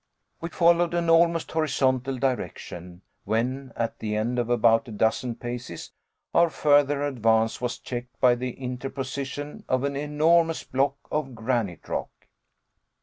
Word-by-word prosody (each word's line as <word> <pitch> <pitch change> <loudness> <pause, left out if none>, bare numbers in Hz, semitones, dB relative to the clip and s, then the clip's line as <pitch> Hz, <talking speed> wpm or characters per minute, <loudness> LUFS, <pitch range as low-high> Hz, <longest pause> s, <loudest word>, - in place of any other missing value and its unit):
We 165 - -4
followed 170 0 +3
an 170 -1 +2
almost 165 0 +3
horizontal 135 -4 +1
direction; 90 -8 -4 0.2
when, 130 +4 -1
at 115 -1 -3
the 105 -1 -2
end 120 +3 0
of 120 -1 -1
about 115 +1 +3
a - - -8
dozen 110 +3 0
paces, 120 -8 -6 0.4
our 170 0 +5
further 145 -2 +3
advance 115 -5 +1
was 125 -1 -2
checked 120 -1 -7
by 125 -1 +6
the 125 0 -3
interposition 135 +3 -5
of 130 0 +1
an 140 0 -1
enormous 160 +3 +2
block 135 +1 0 0.2
of 135 -5 -2
granite 110 -6 -2
rock. - - -3
130 Hz, 140 wpm, -26 LUFS, 120-145 Hz, 0.4 s, by